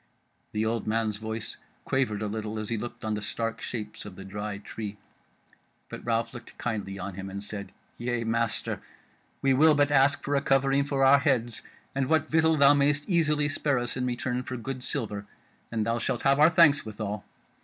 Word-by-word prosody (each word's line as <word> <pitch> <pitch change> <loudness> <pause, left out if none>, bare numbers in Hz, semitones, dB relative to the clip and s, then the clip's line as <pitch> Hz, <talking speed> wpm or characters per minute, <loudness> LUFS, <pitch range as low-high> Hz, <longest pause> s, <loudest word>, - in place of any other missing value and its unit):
The 105 +1 0
old 115 0 -1
man's 110 -1 0
voice 110 0 -5 0.3
quavered 110 -6 0
a - - -1
little 110 +1 -4
as 110 -1 -4
he 115 - 0
looked 120 -1 -7
on 110 - 0
the 105 - -2
stark 115 +2 -3
shapes 105 -3 -5
of 105 -3 -9
the 95 - -9
Dry 105 +1 -4
Tree; 105 0 -7 0.9
but - - -8
Ralph 115 0 0
looked 120 -2 -11
kindly 105 -4 -3
on 95 +1 -5
him, 95 +1 -6
and 100 +1 -6
said: 100 -1 -6 0.3
"Yea, 120 0 -1
my 115 - -1
master, 115 0 -1 0.6
we 135 -1 +4
will 155 +3 +6
but 145 0 +3
ask 140 0 +4
for 145 - 0
a 140 - +2
covering 135 0 +3
for 140 -1 +2
our 140 +1 +7
heads, 125 -5 +1 0.3
and 135 -1 0
what 155 -1 +2
victual 160 0 +4
thou 140 0 +7
mayst 145 0 +2
easily 155 -5 +2
spare 145 -1 0
us 120 -1 -2
in 125 -1 -1
return 125 0 -1
for 130 0 -5
good 125 +2 -5
silver, 105 -7 -2 0.4
and 110 -2 0
thou 115 +1 0
shalt 120 - -2
have 140 +1 +4
our 155 +2 +8
thanks 155 -4 +5
withal. 105 -1 -5
120 Hz, 200 wpm, -28 LUFS, 110-140 Hz, 0.9 s, our